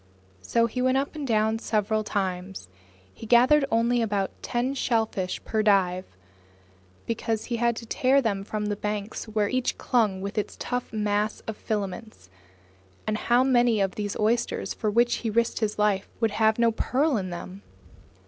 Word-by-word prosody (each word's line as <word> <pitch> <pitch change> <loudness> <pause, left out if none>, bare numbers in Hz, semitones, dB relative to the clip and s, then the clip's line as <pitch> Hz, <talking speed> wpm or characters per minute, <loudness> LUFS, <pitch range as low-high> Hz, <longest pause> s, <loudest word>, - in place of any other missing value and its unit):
So 230 - +2
he 240 +2 -3
went 255 +1 +3
up 275 +1 -1
and 300 -3 -5
down 220 -1 +2
several 215 0 0
times. 190 - -3 0.4
He 225 - -10
gathered 255 +5 +5
only 235 +1 +2
about 205 -3 0
ten 245 +3 -1
shellfish 220 -8 -1
per 220 - 0
dive, 190 -3 +2 1.0
because 225 -1 -2
he 240 - -2
had 235 0 +1
to 230 - -7
tear 260 +4 +3
them 205 -6 -1
from 210 +1 -3
the 205 0 -1
banks 210 0 -4
where 215 -1 0
each 255 +2 -1
clung 215 -6 +1
with 200 +3 -3
its 210 - -5
tough 245 0 -3
mass 210 0 -1
of 220 - -6
filaments. 205 - -5 0.7
And 215 - 0
how 240 +3 +3
many 240 -4 +3
of 195 -1 +1
these 205 -1 -4
oysters 230 +3 0
for 215 - -2
which 240 +3 +3
he 230 - -3
risked 230 +2 +1
his 215 -2 -1
life 205 -2 +1
would 225 -2 +1
have 220 +1 +2
no 235 -1 +3
pearl 270 +6 +1
in 190 -4 -2
them! 180 +2 -7
220 Hz, 170 wpm, -26 LUFS, 205-235 Hz, 1.0 s, gathered